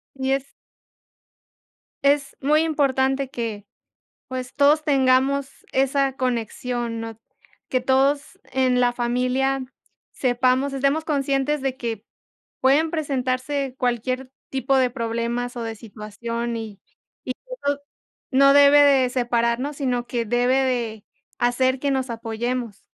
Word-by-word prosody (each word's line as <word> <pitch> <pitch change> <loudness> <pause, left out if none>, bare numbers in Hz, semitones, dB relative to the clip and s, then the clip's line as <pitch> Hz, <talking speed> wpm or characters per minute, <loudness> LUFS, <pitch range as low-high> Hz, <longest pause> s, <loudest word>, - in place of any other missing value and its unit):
Y 265 0 -1
es 275 0 -2 1.5
Es 280 0 +2
muy 300 +3 +3
importante 270 -3 +1
que, 225 -5 -4 0.7
pues, 255 -1 -5
todos 295 +2 +4
tengamos 270 0 +2
esa 270 0 +2
conexión, 240 -1 -2
¿no? 225 -1 -7 0.5
Que 255 - 0
todos 270 +3 +1
en 255 -1 +2
la 245 -1 +3
familia 255 +2 0 0.5
sepamos, 255 +2 +1
estemos 275 +3 +1
conscientes 280 -1 0
de 270 -1 -1
que 230 -4 -5 0.6
pueden 285 +5 +3
presentarse 270 -2 -2
cualquier 255 +1 -1 0.2
tipo 270 0 +1
de 255 -1 +3
problemas 235 0 -3
o 235 - -3
de 225 -1 -5
situación, 230 +2 -5
y 215 -3 -7 0.4
y 255 - -4
que - - -67 0.3
no 285 0 +1 0.5
no 275 +1 +6
debe 285 +1 +7
de 275 -3 +5
separarnos, 240 +2 0
sino 250 -4 -1
que 235 -2 -1
debe 245 +3 +2
de 235 -5 -2 0.3
hacer 255 +2 +2
que 280 +1 0
nos 265 -2 -1
apoyemos. 230 0 -4
255 Hz, 125 wpm, -23 LUFS, 240-275 Hz, 1.5 s, debe